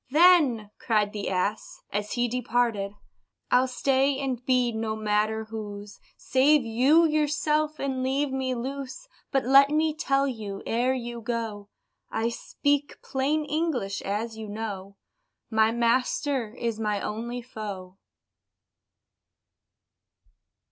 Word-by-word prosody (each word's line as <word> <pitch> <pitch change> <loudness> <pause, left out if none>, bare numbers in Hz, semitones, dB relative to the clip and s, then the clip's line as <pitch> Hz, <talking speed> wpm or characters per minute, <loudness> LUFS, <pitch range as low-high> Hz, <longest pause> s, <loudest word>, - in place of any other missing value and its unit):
"Then," 290 - +5
cried 210 -3 +1
the 205 -1 -3
ass, 190 +3 -2
as 205 +1 -2
he 245 0 +1
departed 235 -4 0 0.6
"I'll 255 +1 +5
stay, 270 +2 +1
and 260 -3 -3
be 250 -2 +2
no 220 -1 -2
matter 215 +1 0
whose; 205 -2 -7 0.2
Save 275 +1 +3
you 265 +9 +4
yourself, 305 0 +1
and 265 -2 -2
leave 270 +2 0
me 260 -1 -1
loose 275 - -6 0.2
But 270 -2 +1
let 275 +2 +7
me 310 +1 +2
tell 275 -2 +1
you, 210 -6 -5
ere 245 +3 +1
you 240 -2 -5
go, 225 -3 -4 0.4
(I 225 +1 0
speak 285 +4 -1
plain 290 +3 0
English, 295 - -1
as 220 +3 -3
you 220 -1 -7
know,) 200 -2 -6 0.5
My 220 0 +4
master 240 +1 0
is 230 -3 -3
my 210 -2 0
only 235 +4 -4
foe." 200 -5 -7
240 Hz, 120 wpm, -26 LUFS, 215-275 Hz, 0.6 s, let